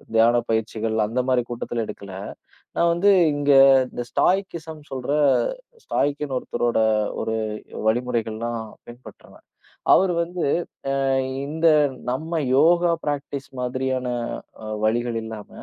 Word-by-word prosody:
தியான 115 +2 +5
பயிற்சிகள் 110 0 -1
அந்த 120 +4 -1
மாரி 130 -1 +3
கூட்டத்துல 120 -1 -3
எடுக்கல, 100 -1 -8 0.6
நான் 170 0 +3
வந்து 200 +4 +4 0.2
இங்க 145 0 +1 0.4
இந்த 120 - -5
ஸ்டாய்கிசம் 170 -5 0
சொல்ற 130 +1 -4 0.7
ஸ்டாய்க்ன்னு 145 -2 -1
ஒருத்தரோட 120 -2 -1 0.4
ஒரு 110 - -2 0.5
வழிமுறைகள்லாம் 115 -1 -1 0.3
பின்பற்றுவேன். 120 +2 -14 0.5
அவரு. 185 -1 +4
வந்து 175 0 -4 0.6
அ - - +1 0.4
இந்த 160 +2 +1 0.4
நம்ம 160 +6 -3 0.2
யோகா 170 +3 +4
ப்ராக்ட்டிஸ் 145 -1 -4
மாதிரியான 130 0 -2 0.6
அ - - -6 0.2
வழிகள் 120 +1 0
இல்லாம, 110 -2 -8
130 Hz, 110 wpm, -23 LUFS, 115-155 Hz, 0.7 s, தியான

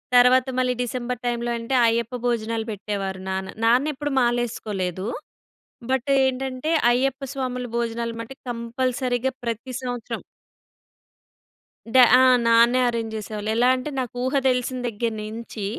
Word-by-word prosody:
తరువాత 250 +1 +6
మళ్ళీ 255 0 +2
డిసెంబర్ 245 0 -3
టైంలో 240 0 -1
అంటే 230 +3 -2
అయ్యప్ప 235 +2 0
భోజనాలు 230 -2 -1
పెట్టేవారు 195 -2 -4
నాన్న, 190 0 -3
నానేప్పుడూ 285 +5 +2
మాలేసుకోలేదు. 215 -6 -1 0.9
బట్ 265 +1 0 0.2
ఏంటంటే, 265 +3 -2 0.2
అయ్యప్ప 265 +2 0
స్వాముల 250 -2 -3
భోజనాలు 230 0 -2
మట్టి 250 +4 -9
కంపల్సరీగా 245 +2 -1
ప్రతి 230 +3 -4
సంవత్సరం. 245 -3 -5 1.7
డ - - -7 0.2
ఆ! - - +6 0.3
నాన్నే 235 +2 +5
అరేంజ్ 230 -2 -3
జేసేవాళ్ళు. 215 0 -5
ఎలాంటే 255 +4 +2
నాకు 250 -1 -3
ఊహ 260 +2 -1
దెలిసిన 255 0 0
దగ్గర 230 +1 -2
నించి, 215 -1 -6
240 Hz, 120 wpm, -23 LUFS, 230-255 Hz, 1.7 s, తరువాత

